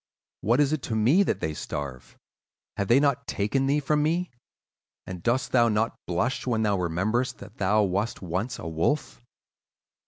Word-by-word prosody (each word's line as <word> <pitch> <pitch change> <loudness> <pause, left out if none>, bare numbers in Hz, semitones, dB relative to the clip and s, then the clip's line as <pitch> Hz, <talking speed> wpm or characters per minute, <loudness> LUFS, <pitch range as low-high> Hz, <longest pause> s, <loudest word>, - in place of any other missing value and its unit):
What 120 +5 +2
is 145 0 +3
it 155 - -1
to 110 - -1
me 125 - +4
that 200 - 0
they 80 - -1
starve? 70 -4 -6 0.6
Have 100 - -2
they 120 +5 +5
not 140 -1 +1
taken 135 +7 0
thee 145 +2 +2
from 150 +1 +1
me, 170 +4 0 0.7
and 90 -2 -7
dost 120 +7 0
thou 120 -2 +4
not 110 +2 +1
blush 120 +10 -1
when 110 -3 +1
thou 100 -3 +1
rememberest 95 +9 0
that 105 +2 -13
thou 105 +2 +3
wast 100 +4 -1
once 95 +7 -3
a 80 - -7
wolf? 85 - -1
110 Hz, 175 wpm, -26 LUFS, 95-135 Hz, 0.7 s, they